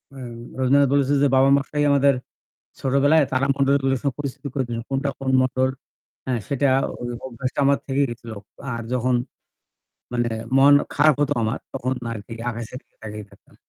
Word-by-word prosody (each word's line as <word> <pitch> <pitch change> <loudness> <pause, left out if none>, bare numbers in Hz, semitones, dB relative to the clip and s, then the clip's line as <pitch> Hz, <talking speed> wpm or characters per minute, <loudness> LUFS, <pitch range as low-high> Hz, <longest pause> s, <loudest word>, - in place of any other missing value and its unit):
এ্যা 135 - -9 0.4
রবীন্দ্রনাথ 140 +2 +4
বলেছে 140 0 +2
যে 145 - +5
বাবা-মশাই 140 +2 +3
আমাদের 140 0 +4 0.7
ছোটবেলায় 145 +3 +3
তারামন্ডলগুলোর 135 0 +2
সাথে 140 -3 -1
পরিচিতি 140 0 -5
করেছেন। 120 -4 -2
কোনটা 135 +1 -1
কোন 135 -1 -2
মন্ডল 130 0 +1 0.6
হ্যা 130 - -2 0.2
সেটা 140 0 +1 0.3
ওই 120 - -3 0.2
অভ্যাসটা 130 +2 -4
আমার 140 0 +4
থেকেই 140 +1 +2
গেছিল। 115 -1 -8 0.4
আর 115 - -4
যখন 125 0 +1 1.0
মানে 120 -1 0 0.3
মন 140 +1 +7 0.2
খারাপ 150 -1 +5
হতো 145 0 +2
আমার। 110 +4 -1
তখন 130 -1 -2 0.2
আরকি 110 0 -7 0.2
আকাশের 115 +2 -7
দিকে - - -44
তাকিয়ে 105 -1 -7
থাকতাম। - - -22
135 Hz, 150 wpm, -23 LUFS, 125-140 Hz, 1.0 s, মন